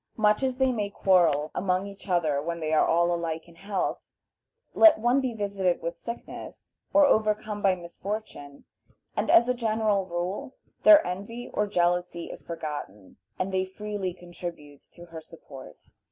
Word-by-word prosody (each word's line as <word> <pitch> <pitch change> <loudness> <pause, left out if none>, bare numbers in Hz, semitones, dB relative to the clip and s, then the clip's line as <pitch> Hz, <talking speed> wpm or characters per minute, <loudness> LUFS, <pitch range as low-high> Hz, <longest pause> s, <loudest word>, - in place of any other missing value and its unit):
Much 210 0 +3
as 260 -1 -1
they 265 -1 +3
may 210 -4 -2
quarrel 170 -7 +2
among 185 0 0
each 200 0 -11
other 160 -6 +1
when 170 +3 -3 0.2
all 170 +2 +3
are - - +2
alike 165 -1 -4
in 170 - -16
health, 195 +3 -3 0.7
let 330 -2 +7
one 240 +5 +2
be 260 -2 -1
visited 200 -4 -1
with 170 +1 -3
sickness, 235 +7 -9 0.2
or 295 0 +6
overcome 215 -3 +1
by 195 -2 +3
misfortune, 175 -4 -7 0.5
and, - - -1
as 240 - +6
a 250 - +2
general 215 -4 0
rule, 180 +8 -4 0.3
their 315 -1 +8
envy 205 +7 -6
or 210 - 0
jealousy 175 -2 0
is - - -10
forgotten, 150 - -7 0.2
and 190 +1 -3
they 185 0 +2
freely 200 0 -4
contribute 175 -5 -9
to 175 - -13
her 165 -2 -9
support. 145 -5 -13
185 Hz, 155 wpm, -27 LUFS, 170-215 Hz, 0.7 s, their